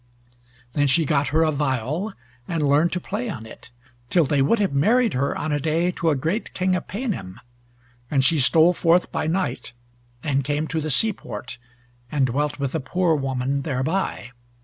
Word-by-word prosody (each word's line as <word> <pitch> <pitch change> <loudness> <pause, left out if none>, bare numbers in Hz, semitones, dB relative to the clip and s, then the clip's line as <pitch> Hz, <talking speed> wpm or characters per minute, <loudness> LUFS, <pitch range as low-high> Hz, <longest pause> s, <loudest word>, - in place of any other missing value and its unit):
Then 145 -1 +2
she 160 +4 +3
got 145 0 +1
her 160 +2 +2
a 155 - +2
viol, 145 - -1 0.3
and 160 -4 0
learned 150 +5 +3
to 180 - -1
play 215 +7 -4
on 110 - -6
it, 110 - -13 0.4
till 175 - +4
they 140 0 +1
would 185 +12 +3
have 200 -7 0
married 220 - +3
her 140 +2 0
on 155 - -2
a 145 - +1
day 165 +4 +1
to 165 -2 -1
a 150 - +2
great 165 - -2
King 185 0 +1
of 180 - -4
Paynim, 200 - -4 0.7
and 135 -2 +2
she 160 0 +4
stole 160 +6 +5
forth 175 +1 +2
by - - -2
night, 180 -6 -2 0.5
and 140 -3 0
came 145 +3 -1
to 160 - -1
the 155 - -3
sea 215 +10 +3
port, 110 - -8 0.5
and 140 -3 +2
dwelt 145 +4 -1
with 140 -2 -3
a 160 - 0
poor 180 +4 +1
woman 135 0 -1
thereby. 135 -1 -2
155 Hz, 190 wpm, -23 LUFS, 135-180 Hz, 0.7 s, stole